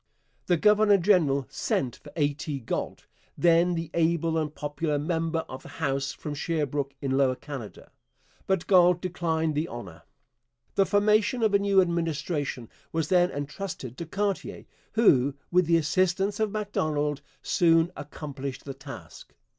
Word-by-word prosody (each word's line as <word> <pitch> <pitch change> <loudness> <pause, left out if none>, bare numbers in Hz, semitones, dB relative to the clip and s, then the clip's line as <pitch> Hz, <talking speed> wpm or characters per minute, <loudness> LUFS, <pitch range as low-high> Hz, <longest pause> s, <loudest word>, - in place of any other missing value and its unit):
The 175 - +3
governor 210 +2 +5
general 165 -8 +3
sent 130 -2 -1
for 145 - -14
A. 145 -2 +1
T. 145 0 -5
Galt, 115 - -4 0.3
then 170 +1 +4
the 165 -1 -4
able 165 0 +1
and 155 -2 -1
popular 150 +1 -2
member 165 +1 -1
of 130 0 -8
the - - -12
House 140 -3 -2
from 150 - -6
Sherbrooke 145 -2 -2
in 135 - -1
Lower 135 -1 +3
Canada. 130 -6 -9 0.6
But 190 -3 +1
Galt 180 -2 +5
declined 165 -3 -1
the 150 +3 -1
honour. 95 - -9 0.7
The 195 -1 +3
formation 215 +3 +2
of 215 -2 +3
a 200 - +5
new 200 -1 +3
Administration 160 -7 -2 0.2
was 160 -2 -1
then 180 -1 +4
entrusted 145 - -5
to 170 - -5
Cartier, 200 +2 -3 0.3
who, 140 - +4 0.2
with 180 -1 +3
the 170 0 +5
assistance 185 +5 +1
of 220 -1 +1
Macdonald, 155 -9 -1 0.2
soon 165 0 +3
accomplished 140 -2 -7
the 140 - -5
task. 135 +1 -11
160 Hz, 145 wpm, -27 LUFS, 145-180 Hz, 0.7 s, governor